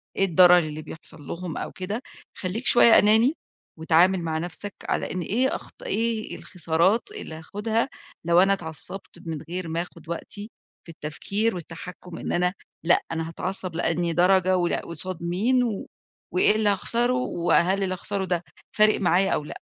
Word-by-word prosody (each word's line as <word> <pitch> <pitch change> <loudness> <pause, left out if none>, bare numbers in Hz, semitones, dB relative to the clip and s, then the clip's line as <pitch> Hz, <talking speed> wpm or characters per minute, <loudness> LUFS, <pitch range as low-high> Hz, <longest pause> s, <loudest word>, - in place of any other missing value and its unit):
إيه 195 - +3
الضرر 180 0 +7
اللي 155 -1 -4
بيحصل 160 -1 -9
لهم 170 -2 -5
أو - - -4
كده، 200 +5 -4 0.4
خلّيك 205 +7 -3
شوية 235 -3 +7
أناني، 220 +6 +4 0.5
واتعامل 175 +3 +4
مع 160 -1 -1
نفسك 180 +4 -3 0.2
على - - -1
إن 185 - -3
إيه 245 - 0
أخط - - -11
إيه 230 - -1
الخسارات 180 +4 +1
اللي 420 - -7
هاخدها، 220 - -2 0.4
لو 170 +1 +5
أنا 195 +2 +5
اتعصبت 175 +2 -4
من 160 -2 -3
غير 180 -1 -4
ما 165 +1 -1
آخُد 170 -2 -11
وقتي 205 +5 -5 0.4
في - - -14
التفكير 195 +8 -2
والتحكم، 175 +1 -9
إن - - -4
أنا 180 +1 +1 0.3
لأ، 175 - +4
أنا 165 0 -2
هاتعصب 185 0 -3
لأنهي 170 0 0
درجة، 185 +1 +4
ولأ، 175 -1 +1
قُصاد 170 0 -6
مين، 220 +9 +2
و 220 -5 -3 0.5
وإيه 185 +3 +5
اللي 215 -1 +2
هاخسرُه، 235 +5 +1
و 215 -9 -1
هل 190 +3 +3
اللي 185 -1 -1
هاخسرُه 195 +1 -3
ده 175 -1 -1 0.3
فارق 215 0 +5
معايا 185 +1 +3
أو 150 - 0
لأ؟ - - -8
185 Hz, 165 wpm, -25 LUFS, 170-205 Hz, 0.5 s, الضرر